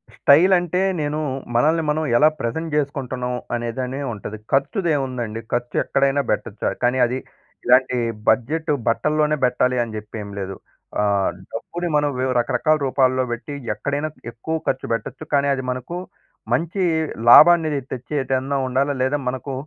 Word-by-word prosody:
Style 170 +7 +5
అంటే, 175 +1 -2 0.2
నేను 150 +1 -1 0.4
మనల్ని 155 +7 +3
మనం 155 +1 +1
ఎలా 150 +4 +6
ప్రెజెంట్ 160 +7 -3
చేసుకుంటున్నాం, 130 -3 -2 0.2
అనేదనే 125 +3 -3
ఉంటది. 105 0 -7
ఖర్చుది 175 - +1
ఏముందండి, 125 -5 -3
ఖర్చు 120 0 -2
ఎక్కడైనా 140 +1 +1
పెట్టొచ్చు. - - -2 0.2
కానీ, 125 +1 +2
అది 125 +2 -2 0.5
ఇలాంటి 125 0 +4 0.3
బడ్జెట్ 155 +6 +1 0.2
బట్టల్లోనే 150 +5 +2
పెట్టాలి 125 0 +1
అని 115 -2 -7
చెప్పి 105 +1 -9
ఏమి 100 0 -9
లేదు. 95 0 -4 0.5
ఆహ్, 100 -2 +2 0.2
డబ్బుని 175 0 -4
మనం 145 0 +2
వివ్ 130 0 0
రకరకాల 135 +6 +2
రూపాల్లో 130 -1 +2
పెట్టి, 130 +5 -7 0.2
ఎక్కడైనా 145 +8 -2 0.2
ఎక్కువ 160 +8 -3
ఖర్చు 130 - -1
పెట్టొచ్చు. 120 +7 -5
కానీ, 140 0 +2
అది 130 -1 -5
మనకు 130 +7 -5 0.6
మంచి 170 +4 -1 0.5
లాభాన్ని 165 +4 +8 0.2
తెచ్చేదన్నా 135 +1 -2
ఉండాలా. 135 +3 0
లేదా 140 +3 0
మనకు 130 +2 -5
135 Hz, 135 wpm, -21 LUFS, 125-150 Hz, 0.6 s, లాభాన్ని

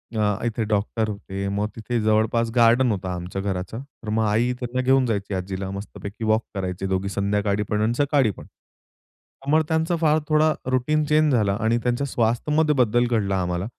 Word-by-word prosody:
अ, 110 - 0 0.2
इथे 115 -1 -1
डॉक्टर 110 +1 -1
होते, 100 -1 -5
मग 100 +1 -1
तिथे 120 +2 -2
जवळपास 110 +2 +2
गार्डन 120 +1 +5
होतं 95 -3 -3
आमच्या 90 +2 -4
घराचं. 95 +2 -3
तर 130 -5 -12
मग 110 +1 +1
आई 110 +4 +2
त्यांना 125 +1 -2
घेऊन 130 0 +3
जायची 100 -4 -2
आजीला 95 +1 -4
मस्तपैकी 100 +2 -7
वॉक 110 +1 +2
करायचे 95 -1 -3
दोघी 95 +1 -1
संध्याकाळी 100 +1 0
पण 105 0 0
आणि 110 +2 +1
सकाळी 145 -5 +2
पण. - - -12
त्यामुळे 150 +4 -5
त्यांचा 160 +2 +1
फार 155 -1 +4
थोडा 155 0 +3 0.2
रुटीन 150 +5 +1
चेंज 150 -1 +3
झालं 105 -5 +2
आणि 115 +1 +2
त्यांच्या 125 +3 0
स्वास्थ्यमध्ये 150 +6 +1
बद्दल 120 +2 +2
घडला 100 -5 0
आम्हाला, 90 +1 -2
110 Hz, 175 wpm, -23 LUFS, 100-130 Hz, 0.2 s, गार्डन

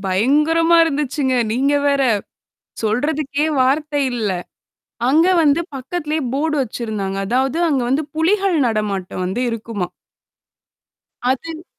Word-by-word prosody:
பயங்கரமா 300 - +3
இருந்துச்சுங்க. 285 -3 -1 0.2
நீங்க 275 +5 +1
வேற. 280 -1 +2 0.8
சொல்றதுக்கே 285 +6 0
வார்த்தை 290 +3 +1
இல்ல. 220 -4 -1 0.8
அங்க 315 +6 +4 0.2
வந்து 295 +2 +3 0.2
பக்கத்திலேயே 305 +3 -3
போர்டு 305 +2 0
வச்சிருந்தாங்க. 215 -5 -4
அதாவது 260 +6 0
அங்க 270 -5 +1
வந்து 280 +4 +2
புலிகள் 370 +3 +2
நடமாட்டம் 200 -5 -2
வந்து 190 +7 -2
இருக்குமா. 225 -4 -4 1.4
அது 320 +5 -4
275 Hz, 100 wpm, -19 LUFS, 230-310 Hz, 1.4 s, அங்க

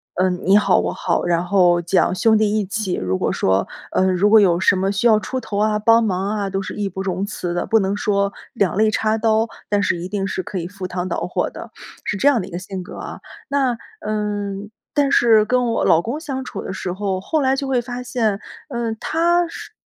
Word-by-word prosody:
嗯， 180 -1 +1
你 190 +2 +5
好 210 - +3
我 - - -1
好， - - -1
然 170 -1 +1
后 175 -2 +4
讲 175 +2 +2
兄 220 +3 +4
弟 215 0 +2
义 215 - +1
气， 200 -1 -3
如 95 0 -1
果 - - 0
说， 95 +1 +1 0.2
呃， - - +2
如 190 +3 +3
果 220 +1 +7
有 175 -4 +3
什 190 - +4
么 190 +1 0
需 205 +4 +2
要 215 -2 +5
出 260 +4 -4
头 220 -3 -5
啊， 210 0 +2
帮 230 +2 +5
忙 195 -2 -1
啊， 205 -2 -2
都 195 0 -2
是 190 - -6
义 205 -1 -2
不 190 +1 -6
容 190 0 -2
辞 190 -4 -4
的， 175 - -1
不 225 - +3
能 195 0 -1
说 200 -1 +1 0.2
两 190 -5 0
肋 215 0 +3
插 215 +1 +1
刀， 220 0 +2 0.2
但 205 -1 +2
是 175 - +1
一 170 +1 -5
定 195 -1 -2
是 190 - -3
可 190 +1 -4
以 170 - -4
赴 190 0 -7
汤 180 0 -4
蹈 - - -2
火 - - -1
的， - - -10 0.3
是 - - -1
这 275 - +2
样 270 -5 +2
的 185 - -7
一 - - -12
个 175 - -4
性 185 0 -6
格 - - -10
啊。 - - -7 0.3
那， 270 -3 +1 0.3
嗯， 205 -1 -3 0.2
但 285 -2 +2
是 225 -5 +5
跟 250 +2 +1
我 230 -1 0
老 165 - +5
公 240 - -4
相 270 -5 -5
处 - - -6
的 - - -5
时 180 -1 -4
候， 190 -1 -2
后 310 +9 0
来 265 -1 +2
就 275 0 -3
会 260 -2 +1
发 245 +1 -6
现， 225 -5 0 0.3
嗯， 235 -4 -2
他 345 +2 +2
是 - - -9
205 Hz, 260 characters per minute, -20 LUFS, 185-230 Hz, 0.3 s, 果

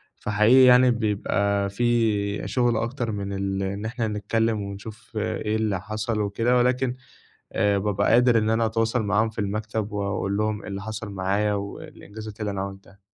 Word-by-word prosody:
فحقيقي 110 +5 +4
يعني 125 0 +7
بيبقى 100 -2 0
في 105 -2 0
شُغل 120 -3 +1
أكتر 115 0 -2
من 100 -1 -4
ال 95 0 -2
إن 100 +2 -3
إحنا 115 0 -2
نتكلِّم 110 +1 0
ونشوف 100 +3 -8
إيه 110 0 -1
اللي 105 -4 0
حصل 110 +2 -2
وكده 115 +5 +1
ولكن 125 +1 +1 0.6
آآ 100 -1 +2
بابقى 100 0 +1
قادر 120 0 +5
إن 110 0 +1
أنا 115 0 +2
أتواصل 115 +1 0
معاهم 110 +2 +2
في 110 - -9
المكتب 105 +1 -3
وأقول 100 0 -2
لهم 110 -1 -1
إيه - - -10
اللي 100 0 -5
حصل 110 0 -6
معايا 100 +2 0
والإنجازات 105 +1 -7
اللي 105 -1 -2
أنا 95 -1 -3
عملتها. 100 0 -9
105 Hz, 165 wpm, -24 LUFS, 100-115 Hz, 0.6 s, يعني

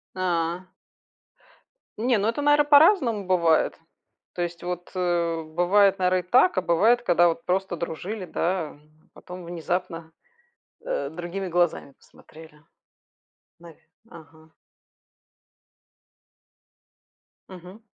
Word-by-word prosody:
А. 175 0 -2 1.3
Не, 235 +1 +1
ну 205 +2 -1
это, 235 +6 -2
наверно, 290 0 +3
по-разному 285 - +4
бывает. 170 -4 +1 0.5
То 175 - -5
есть 170 0 -6
вот, 180 0 -6
э, 170 -2 -1
бывает, 190 +5 +2
наверно, 185 0 +2
и 180 0 -10
так, 350 +9 +4
а - - +3
бывает, 225 +8 +2
когда 175 -6 +3
вот 165 0 -3
просто 190 0 -1
дружили, 180 +5 -6
да, 175 -2 -2
а 145 - -17 0.3
потом 180 0 -11
внезапно, 170 -1 -4 0.7
э, - - -3
другими 175 +3 -6
глазами 175 -5 -1
посмотрели, 155 +1 -18 1.0
навь 170 -2 -15 0.3
ага. 160 -2 -16 3.0
Мгм. 185 +4 -12
180 Hz, 105 wpm, -24 LUFS, 170-195 Hz, 3.0 s, по-разному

